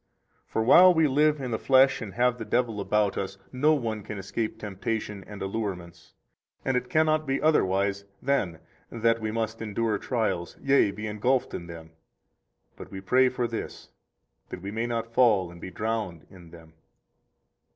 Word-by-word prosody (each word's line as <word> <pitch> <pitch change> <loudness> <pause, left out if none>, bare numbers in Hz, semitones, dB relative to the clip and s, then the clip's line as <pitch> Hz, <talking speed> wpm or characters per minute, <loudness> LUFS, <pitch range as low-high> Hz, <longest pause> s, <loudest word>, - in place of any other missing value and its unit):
For 110 - -1
while 180 +10 +8
we 160 -3 +3
live 150 +2 +2
in 130 -3 -4
the 110 - -1
flesh 130 0 +4
and 105 -4 -7
have 125 0 +2
the - - -4
devil 115 -2 0
about 100 0 +1
us, 95 0 -5
no 150 +5 +3
one 115 -6 -3
can 105 +1 -7
escape 110 +3 -3
temptation 105 0 -4
and 105 -1 -7
allurements; 95 -4 -5 0.5
and 130 - +1
it 125 - -1
cannot 155 -2 +2
be 135 +1 0
otherwise 100 -9 +1 0.2
than 100 - -1 0.3
that 115 0 +1
we 110 - -2
must 115 0 -3
endure 110 -1 -1
trials, 110 -8 -2
yea, 140 -6 +3
be 105 +2 -6
engulfed 115 +5 0
in 85 - -6
them; 80 -1 -10 0.8
but - - -11
we 95 - -7
pray 125 +7 +3
for 125 -1 -2
this, 115 -1 -7 0.6
that 90 - -8
we 100 - -5
may 115 +2 -2
not 115 -1 -3
fall 105 -8 +3
and 85 -1 -13
be - - -6
drowned 105 -5 -3
in 85 -3 -14
them. 80 -1 -15
110 Hz, 170 wpm, -27 LUFS, 95-125 Hz, 0.8 s, while